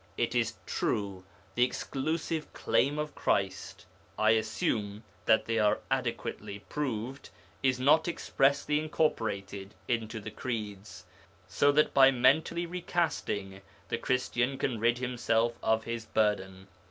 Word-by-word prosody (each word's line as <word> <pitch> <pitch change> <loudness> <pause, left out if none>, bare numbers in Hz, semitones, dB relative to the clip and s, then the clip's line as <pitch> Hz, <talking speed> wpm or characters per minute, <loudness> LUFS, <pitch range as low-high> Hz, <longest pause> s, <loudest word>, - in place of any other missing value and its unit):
It 120 - 0
is 120 -2 +1
true, 100 -3 -2 0.3
the 120 - +3
exclusive 155 +5 -2
claim 145 +3 +1
of 150 0 -3
Christ 95 -1 -1 0.3
(I 110 0 +4
assume 110 -1 -1 0.2
that 110 - +4
they 115 0 0
are 105 -1 +3
adequately 100 - -2
proved) 125 +3 -4 0.3
is 130 -1 +2
not 150 +6 +4
expressly 145 -2 +1
incorporated 100 -11 -2
into 115 -1 -1
the 110 +1 -7
Creeds, 105 -6 -5 0.4
so 145 - +3
that 150 +1 +3
by 135 -1 +8
mentally 140 +7 +3
recasting 165 - -2 0.3
the - - -1
Christian 125 +1 0
can 125 -5 -1
rid 120 +2 +3
himself 120 -2 +1
of 110 0 +2
his 115 -1 -5
burden. 95 -3 0
120 Hz, 125 wpm, -30 LUFS, 105-140 Hz, 0.4 s, by